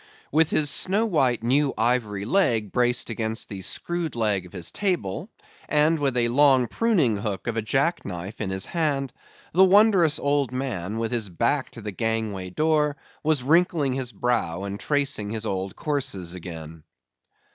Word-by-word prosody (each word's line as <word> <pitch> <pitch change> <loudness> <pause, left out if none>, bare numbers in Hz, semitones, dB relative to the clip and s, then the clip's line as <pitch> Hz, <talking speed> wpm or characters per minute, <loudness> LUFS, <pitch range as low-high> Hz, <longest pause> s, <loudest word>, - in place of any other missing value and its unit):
With 160 +2 +3
his 145 -2 +2
snow 200 +8 +1
white 135 - +1
new 135 +3 +2
ivory 110 -4 0
leg 115 - +1
braced 125 -1 +1
against 110 0 -3
the 100 -2 -6
screwed 170 - -2
leg 105 -5 0
of - - -19
his 90 -4 -5
table, 175 - -2 0.4
and 155 +2 +3
with 135 -3 0
a 120 -1 +2
long 135 0 +5
pruning 155 - +1
hook 100 -2 -4
of 120 - -2
a 115 - 0
jack 140 +10 0
knife 95 +4 -7
in 105 - -2
his 95 0 -1
hand, 145 -5 -1 0.4
the 185 +4 +6
wondrous 190 -5 +5
old 140 -2 0
man, 115 -7 -3
with 115 0 -2
his 115 -5 -1
back 120 - 0
to 115 - -9
the 105 0 -5
gangway 110 -3 -2
door, 150 - +1 0.2
was 155 -4 +1
wrinkling 155 -2 +2
his 130 -2 -3
brow, 100 -6 -1
and 100 0 -5
tracing 140 -8 -1
his 110 0 -4
old 95 -2 -3
courses 130 - -2
again. 80 -3 -9
125 Hz, 170 wpm, -24 LUFS, 105-150 Hz, 0.4 s, the